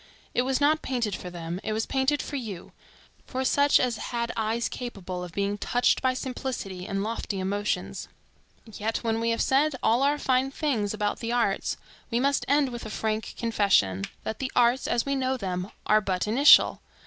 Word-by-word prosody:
It - - +2
was 260 +1 0
not 305 +2 +3
painted 235 -7 -1
for 180 - -7
them, 170 0 -5
it 215 - -2
was 220 +1 -1
painted 270 +2 +1
for 290 - -6
you; 220 -10 -6 0.6
for 260 0 -2
such 285 +2 +4
as 245 -3 0
had 235 -1 -3
eyes 225 +1 0
capable 190 -7 -6
of 180 - -7
being 200 +3 -2
touched 245 +4 +2
by 260 -1 +1
simplicity 250 -9 -5
and 195 -1 -2
lofty 215 -2 -3
emotions. 205 +2 -2 0.6
Yet 220 +1 -3
when 225 -1 0
we 230 0 0
have 230 - +1
said 280 +2 +2
all 230 +3 +3
our 285 +2 +3
fine 260 -1 +1
things 245 -8 -1
about 210 -1 -1
the 230 0 -3
arts, 235 -5 0 0.3
we 235 -1 0
must 280 +2 +1
end 285 -1 +3
with 240 -1 -7
a 220 - -6
frank 220 0 -3
confession, 195 - +2 0.2
that 220 - -4
the 265 -1 -3
arts, 245 +1 +3
as 235 - +1
we 275 - 0
know 265 -1 0
them, 185 -3 -3 0.2
are 215 0 +4
but 185 -3 -1
initial. 260 +7 +6
230 Hz, 190 wpm, -27 LUFS, 205-260 Hz, 0.6 s, initial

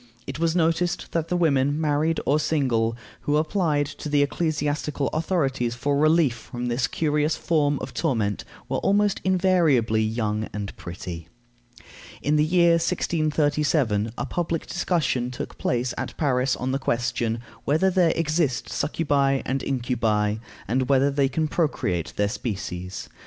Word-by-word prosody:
It 135 +2 -6
was 165 0 +1
noticed 170 +1 0
that 165 -1 -1
the 180 - 0
women, 145 -3 +2
married 155 +1 +1
or 150 +2 +3
single, 120 -7 +1 0.2
who 145 +1 +1
applied 155 -2 +1
to 145 +1 -7
the 145 -1 +4
ecclesiastical 150 -1 -1
authorities 135 -8 0
for 140 +3 0
relief 155 -2 +4
from 120 +1 -5
this 120 +1 +1
curious 150 0 0
form 145 -3 +1
of 130 - -6
torment 115 - 0 0.2
were - - -1
almost 205 0 +2
invariably 170 - +3
young 110 -1 -1
and 100 -1 -5
pretty. 85 -1 -7 0.9
In 150 +2 +1
the 150 - +4
year 170 +1 +4
1637 150 -9 +1
a - - -2
public 165 -2 -2
discussion 155 -8 0
took 125 - -7
place 125 0 0
at - - -5
Paris 130 -3 +1
on 130 +1 -2
the 135 - 0
question, 120 -2 -1 0.3
Whether 160 +7 +3
there 175 -3 +3
exist 155 -5 0
succubæ 140 -3 +1
and 135 +1 -1
incubi, 115 -5 0 0.3
and 130 +1 0
whether 140 +1 +4
they 140 -1 +2
can 155 +3 0
procreate 95 - -1
their 105 0 +1
species? 95 -5 -5
145 Hz, 145 wpm, -24 LUFS, 120-160 Hz, 0.9 s, the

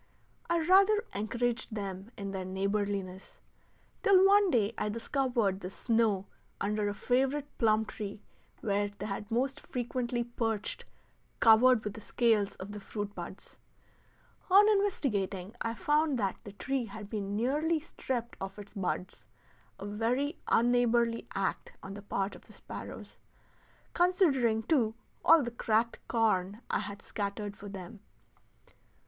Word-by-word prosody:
I 340 - +3
rather 390 +5 +5
encouraged 230 +2 -2
them 195 0 -5
in 200 -1 -4
their 190 -1 -3
neighborliness, 195 0 -2 0.6
till 390 -3 +6
one 400 0 +6
day 230 - +2
I 210 - -1
discovered 230 -3 0
the 185 - -6
snow 220 -2 +1 0.3
under 210 0 0
a 205 - -4
favorite 270 +5 0
plum 220 -1 +3
tree 210 -1 -7 0.4
where 205 -1 0
they 205 0 -5
most 265 +5 0
frequently 245 -1 -2
perched 225 -3 -3 0.5
covered 230 +1 +6
with 210 - -3
the 220 - -9
scales 220 -3 +2
of 190 +2 -8
the 210 - -6
fruit 205 0 -5
buds. - - -9 0.9
On 400 +3 +8
investigating 215 - 0
I 230 0 -1
found 295 +5 +2
that 195 -4 -1
the 205 - -8
tree 260 +4 -2
had 210 -1 -8
been 205 -2 -3
nearly 300 +8 +1
stripped 250 -6 -4
of 195 +1 -5
its 205 -1 -10
buds 185 -2 -3 0.5
a - - -7
very 240 - -1
unneighborly 235 -1 +3
act 195 -1 -2
on 195 - -7
the 205 - -8
part 195 0 -2
of - - -15
the - - -14
sparrows, - - -9 0.8
considering, 285 - +3
too, 225 -6 +2 0.3
all 325 -2 +7
the 240 - -3
cracked 230 0 0
corn 210 -3 +1
I - - +2
had 200 -1 -6
scattered 205 0 -4
for 205 0 -9
them. 195 +1 -8
220 Hz, 140 wpm, -31 LUFS, 200-255 Hz, 0.9 s, On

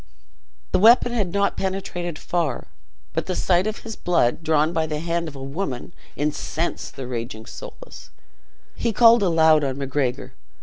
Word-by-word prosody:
The - - +3
weapon 235 +4 +6
had 210 -7 -1
not 200 +1 +1
penetrated 185 -3 -3
far. 165 -8 -2 0.5
But - - -2
the 185 - -1
sight 180 +2 +2
of 215 - -4
his 225 -2 -6
blood, 170 -8 +1
drawn 160 0 +2
by 160 -1 0
the 150 -1 -3
hand 170 +1 -2
of 150 - -8
a 135 - -7
woman, 140 0 -4 0.2
incensed 150 +3 -3
the 135 - -6
raging 115 -2 -5
Soulis. - - -11 0.6
He 230 -1 -1
called 230 +2 +6
aloud 160 -4 +4
on 135 -1 -2
Macgregor. 135 -2 -2
165 Hz, 160 wpm, -23 LUFS, 140-190 Hz, 0.6 s, weapon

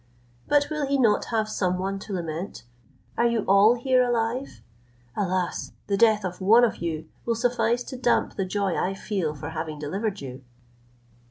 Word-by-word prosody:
But 290 +1 +2
will 305 -2 -1
he 280 0 +1
not 230 -5 +3
have 220 -2 0
some 185 -4 0
one 195 +1 -2
to 205 0 -7
lament? 170 +1 -4 0.6
Are 235 - +4
you 235 -2 +1
all 200 +4 +6
here 255 +1 +2
alive? 240 +2 -1 0.5
Alas! 185 -3 -2
the 200 - 0
death 215 -1 +4
of 180 +1 -5
one 225 +6 +6
of 235 - +2
you 160 -2 -4 0.2
will 230 - 0
suffice 245 0 +1
to 260 - -7
damp 245 -1 +1
the 195 - -1
joy 195 -1 -1
I 195 +2 -1
feel 190 -6 -2
for 145 - -6
having 160 -1 -5
delivered 195 +8 -3
you!" 130 -1 -8
205 Hz, 175 wpm, -25 LUFS, 180-235 Hz, 0.6 s, all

